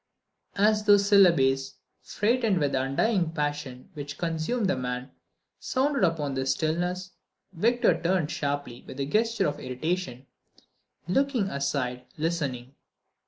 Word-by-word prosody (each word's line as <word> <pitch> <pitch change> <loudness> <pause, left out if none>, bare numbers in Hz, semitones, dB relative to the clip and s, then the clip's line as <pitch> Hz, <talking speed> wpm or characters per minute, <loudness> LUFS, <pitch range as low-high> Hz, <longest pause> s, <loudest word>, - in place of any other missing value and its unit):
As 210 +1 +3
those 205 -1 +6
syllables, 135 -10 +4 0.3
freighted 225 -2 +1
with 145 -4 +1
that 130 -1 0
undying 175 +5 +1
passion 145 -4 -4
which 145 -1 -7
consumed 170 +7 -1
the 185 - +1
man, 125 0 -4 0.5
sounded 270 -2 0
upon 155 -5 +1
the 130 0 -2
stillness, 175 +6 -1 0.4
Victor 215 -2 +2
turned 170 -3 +1
sharply, 140 -4 -3
with 130 - -9
a 140 - 0
gesture 225 +8 +1
of 145 - -3
irritation, 130 0 -3 0.8
looking 245 0 +1
aside, 125 -3 -2
listening. 140 -6 -2
160 Hz, 120 wpm, -27 LUFS, 135-200 Hz, 0.8 s, those